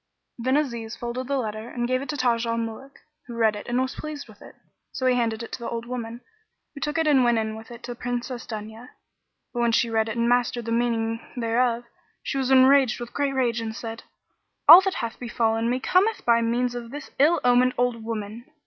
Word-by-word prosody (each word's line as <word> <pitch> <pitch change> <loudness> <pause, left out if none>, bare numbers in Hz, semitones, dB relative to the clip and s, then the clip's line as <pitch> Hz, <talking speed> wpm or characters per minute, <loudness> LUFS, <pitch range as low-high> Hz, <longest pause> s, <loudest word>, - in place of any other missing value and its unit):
Then 260 +4 +2
Aziz 235 -6 -3
folded 240 +1 -5
the 280 0 0
letter 220 -1 -4
and 240 -1 -2
gave 255 +1 0
it 275 - -7
to 295 - -2
Taj 235 -2 +1
al 230 0 -1
Muluk, 230 +4 -6 0.3
who 240 - -7
read 220 -2 +3
it 205 - -8
and 240 +1 0
was 260 0 -1
pleased 305 -3 -7
with 215 -2 -17
it. - - -13 0.4
So 260 - -4
he 255 - +4
handed 230 -2 -1
it - - -9
to - - -5
the 235 - -5
old 230 0 -4
woman, 240 -1 -6 0.5
who 280 - -10
took 295 +1 -2
it 325 - +2
and 280 -4 +4
went 240 -1 +3
in 220 -1 -2
with 220 0 -11
it 240 0 -11
to 245 0 -5
Princess 245 0 -4
Dunya. 220 +2 -8 0.6
But 240 - -3
when 235 -1 +2
she 230 0 +2
read 220 0 +1
it 220 - -4
and 235 0 +1
mastered 245 -1 +1
the 230 - -3
meaning 230 -1 0 0.2
thereof, 235 0 +1 0.4
she 275 - -2
was 265 -1 -1
enraged 265 -1 +5
with 240 0 -7
great 280 -1 -1
rage 240 -3 +1
and 220 -1 -5
said, 225 -1 -6 0.7
"All 335 +5 +12
that 385 0 -1
hath 230 -1 -4
befallen 230 -1 0
me 250 +1 0
cometh 390 +10 +1
by 235 -1 +4
means 240 +2 0
of 240 -1 -6
this 285 +2 -8
ill 310 +5 +5
omened 250 +1 +4
old 245 -2 0
woman!" 220 +1 -5
240 Hz, 230 wpm, -25 LUFS, 230-255 Hz, 0.7 s, All